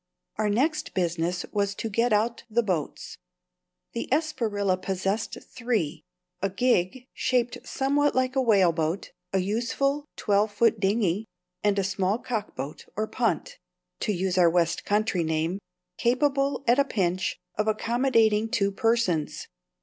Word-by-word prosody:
Our 215 - +1
next 300 +8 0
business 175 0 0
was 200 -1 0
to 225 - -3
get 230 +3 +1
out 225 +3 +1
the 235 +2 +2
boats. 180 -8 -3 0.7
The 235 - -4
Espriella 215 - 0
possessed 195 +3 -2
three 230 - -2 0.4
a 195 - +1
gig, 245 +2 +1
shaped 245 -1 0
somewhat 285 +2 +1
like 255 0 +1
a 265 - +3
whaleboat; 180 -6 +2 0.2
a 195 - +1
useful, 245 +9 0
twelve 205 +1 +2
foot 225 +1 +2
dinghy; 200 0 +1 0.4
and 205 -1 +2
a 195 - +2
small 195 +2 0
cockboat, 215 - -5
or 215 - 0
"punt" - - -1 0.4
(to - - 0
use 185 -1 0
our 175 -2 +6
West 170 0 +1
Country 210 -4 +1
name), 160 +4 -1 0.4
capable, 275 +3 +1
at 240 +3 +5
a - - +6
pinch, 185 -8 -1 0.2
of 210 +1 0
accommodating 225 -1 +2
two 200 -5 +1
persons. 200 -7 0
210 Hz, 135 wpm, -26 LUFS, 185-240 Hz, 0.7 s, our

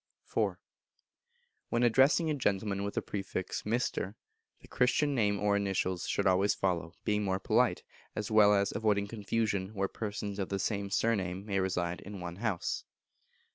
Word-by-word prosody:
iv. - - +2 1.1
When 120 - +1
addressing 135 +7 +4
a - - +2
gentleman 100 -6 0
with 100 - -4
the - - 0
prefix 95 -2 -4
"Mr.," 110 -3 -1 0.5
the - - -15
Christian 130 +3 +2
name 105 -5 +1
or 100 0 +2
initials 95 -3 -1
should 100 - 0
always 95 +2 +3
follow, 85 -3 -1
being 105 0 +1
more 95 -2 0
polite, 95 - +2 0.3
as 105 0 -3
well 105 -1 +6
as 100 0 +2
avoiding 105 -2 +2
confusion 105 -2 -1
where 95 0 0
persons 105 -1 -4
of 95 - -2
the 100 - -1
same 100 0 -1
surname 95 -3 0
may 100 -2 0
reside 90 -2 -1
in 100 0 -8
one 85 0 -6
house. 100 -5 -2
100 Hz, 160 wpm, -31 LUFS, 95-110 Hz, 1.1 s, well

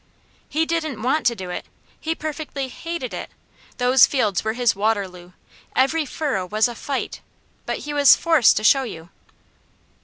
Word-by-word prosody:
"He 320 +2 +1
didn't 315 -9 -3
WANT 270 +4 +1
to 235 - +2
do 185 -3 -7
it. - - -6 0.3
He 320 +1 -2
perfectly 295 -3 -5
HATED 330 -3 -5
it. - - -6 0.5
Those 250 0 +5
fields 215 - 0
were 220 0 -1
his 240 -3 +1
Waterloo. 195 -4 -2 0.4
Every 295 +4 +2
furrow 255 - -2
was 215 +4 +2
a 240 - -6
FIGHT, 270 +3 -4 0.5
but - - -1
he 295 - -4
was 285 -1 +7
FORCED 320 -8 +4
to 215 - -1
show 270 +5 +5
you." 175 -9 -8
255 Hz, 160 wpm, -22 LUFS, 215-300 Hz, 0.5 s, was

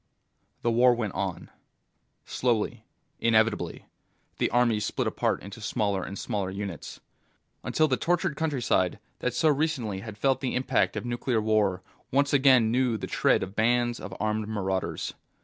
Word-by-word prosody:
The 120 - +2
war 120 +1 +5
went 110 -5 -3
on. 95 -2 -4 0.7
Slowly, 120 -4 -1 0.3
inevitably, 110 -1 +1 0.5
the - - +2
armies 120 -3 +2
split - - -1
apart - - -1
into 100 +4 -9
smaller 105 -3 0
and 100 - -6
smaller 100 -3 -2
units, 95 -4 -6 0.6
until 155 - +2
the 130 -3 +1
tortured 175 -2 0
countryside 130 - 0 0.2
that 125 -1 -2
so 160 - +3
recently 135 -9 0
had 105 0 -8
felt 135 +4 +1
the 130 - -2
impact 125 - +1
of - - -4
nuclear 120 0 0
war 105 -4 +1 0.3
once 140 +2 +2
again 130 -5 +5
knew 125 -2 +2
the - - -5
tread - - +2
of 95 +2 -7
bands 120 +1 +2
of 95 0 -7
armed 110 0 -1
marauders. 95 -3 -2
115 Hz, 150 wpm, -27 LUFS, 100-125 Hz, 0.7 s, war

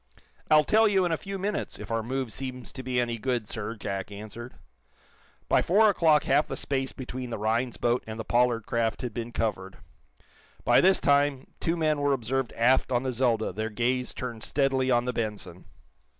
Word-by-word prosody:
"I'll 155 0 +6
tell 220 +7 +4
you, 195 -3 +3
in 175 - 0
a - - +2
few 195 +4 -6
minutes, 200 +2 -3
if 105 +1 -9
our 115 0 0
move 130 0 -3
seems 130 0 -6
to 130 - -7
be 130 -1 -1
any 120 -1 -1
good, 120 -3 -1
sir," 110 +2 -5
Jack 100 -2 -5
answered. 110 +4 -9 0.9
By - - +4
four 210 +5 +4
o'clock 160 -5 +4
half 150 - +2
the - - -5
space 135 -1 -2
between 130 -1 -6
the 115 - -4
Rhinds 115 +3 -1
boat 120 +1 +1
and 110 0 -6
the 110 - -4
Pollard 120 -2 +2
craft 115 0 -1
had 120 -3 -4
been 120 +1 -5
covered. 95 -5 -3 0.9
By - - +5
this 190 +1 +4
time 140 -1 +2
two 170 +1 -1
men 155 -2 +1
were 145 0 +2
observed 130 0 -1
aft 130 +3 +3
on 120 0 +1
the 130 -1 -2
"Zelda," 115 -5 +1
their 110 +3 -3
gaze 125 +3 -1
turned 120 -3 -6
steadily 135 0 +1
on 120 -1 +3
the 125 - -1
"Benson." 110 -3 -5
125 Hz, 195 wpm, -27 LUFS, 115-135 Hz, 0.9 s, I'll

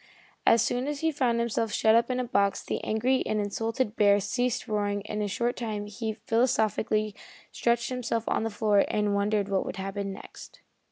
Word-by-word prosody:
As 230 -1 +6
soon 245 +3 -1
as 295 -1 -3
he 320 0 +2
found 250 -5 +1
himself 230 -1 -1
shut 220 +1 +3
up 235 +2 +3
in 255 0 0
a - - 0
box 200 -5 +1
the - - -3
angry 250 +5 +1
and 215 - -1
insulted 225 +3 -2
bear 205 -1 +5
ceased 245 +4 -1
roaring 205 -1 -1
and 210 0 -4
in - - 0
a - - -2
short 235 +5 -1
time 215 -3 -4
he 220 +2 -4
philosophically 220 -3 +1 0.4
stretched 235 0 0
himself 235 -3 -2
on - - +1
the 225 - -1
floor 210 -1 +3
and 210 -1 0
wondered 200 0 +1
what 195 -1 0
would - - -5
happen 195 +1 -4
next. 195 - -11
220 Hz, 200 wpm, -28 LUFS, 205-235 Hz, 0.4 s, As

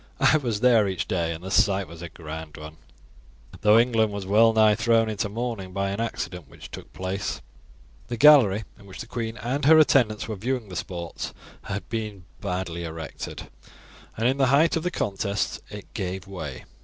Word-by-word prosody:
I 155 - +5
was 120 -7 -2
there 115 -5 +5
each 95 -2 -2
day 85 -3 0
and 80 +1 -7
the 95 - -6
sight 100 -2 +3
was 85 +1 -11
a 85 - -6
grand 80 -1 -8
one, 75 +1 -10 0.8
though 105 +1 +5
England 115 -2 +3
was 100 -1 -5
well 110 +4 +5
nigh 110 -1 +5
thrown 115 0 +2
into 105 0 -2
mourning 110 -4 -4
by 100 0 -1
an 100 - -4
accident 90 -8 -4
which - - -12
took - - -10
place. 95 +2 -3 0.7
The 120 - -4
gallery 120 -8 +6 0.2
in 100 - -15
which 95 - -11
the - - -7
queen 115 -2 -4
and 135 +4 -3
her 160 +2 +8
attendants 110 -10 +3
were 110 - -4
viewing 120 +1 -3
the 90 - -8
sports 85 -1 -5 0.3
had 100 +1 -4
been 105 -6 -5 0.2
badly 90 -3 -3
erected, 80 -1 -7 0.7
and 115 +2 +2
in 130 +2 +1
the 135 -1 +3
height 145 +5 +4
of 165 - 0
the 180 - -1
contests 100 - -2
it 105 -2 -10
gave 95 -2 -4
way. 80 -9 -7
105 Hz, 190 wpm, -25 LUFS, 95-115 Hz, 0.8 s, her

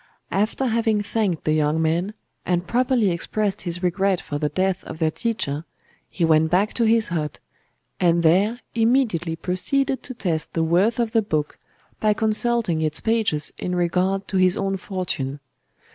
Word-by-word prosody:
After 215 +7 0
having 225 -3 +1
thanked 200 -5 -1
the 155 - +1
young 155 0 +1
men, 170 +6 0 0.3
and 175 0 0
properly 240 -1 +2
expressed 200 +4 -2
his 175 +1 -2
regret 190 +1 +1
for 145 - -5
the 150 -1 0
death 190 +1 -1
of - - -7
their 160 -1 +1
teacher, 165 -10 -2 0.5
he 170 - 0
went 160 0 +3
back 195 +5 +2
to 235 - +1
his 225 0 +3
hut, 155 -4 -3 0.6
and 170 -1 +3
there 200 +9 +3
immediately 225 -8 +1
proceeded 260 +11 0
to 255 - -7
test 170 -9 -2
the 165 - +1
worth 185 +9 +2
of 230 -2 0
the 225 - +3
book 155 -7 -2 0.4
by 215 -1 +3
consulting 220 -5 +1
its 155 0 +3
pages 220 -10 0
in 180 - -2
regard 185 +3 0
to 195 - 0
his 185 -1 +4
own 195 0 -1
fortune. 175 -8 -4
185 Hz, 165 wpm, -23 LUFS, 165-220 Hz, 0.6 s, his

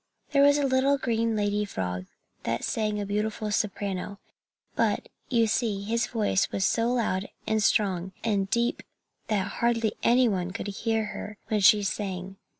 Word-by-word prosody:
There 280 -1 +4
was 285 +1 +6
a 290 - +1
little 270 +1 +3
green 230 -3 0
lady 205 0 +1
frog 90 - -4 0.3
that 115 +1 -2
sang 215 -2 -1
a 205 - -2
beautiful 210 +1 -2
soprano, 200 -2 -2 0.6
but, - - 0 0.2
you 235 -3 +3
see, 215 -2 0
his 225 +1 0
voice 210 -4 +1
was 190 - 0
so 230 0 +2
loud 210 -6 0 0.2
and 220 0 +1
strong 190 -3 +1
and 200 -3 0
deep 235 +2 +1 0.5
that 200 -3 0
hardly 230 -2 +1
any 245 +1 +4
one 185 -4 -1
could - - -5
hear 225 +2 -1
her 210 0 -7
when 215 - +2
she 205 +1 +6
sang. 190 0 -3
210 Hz, 160 wpm, -27 LUFS, 195-230 Hz, 0.6 s, was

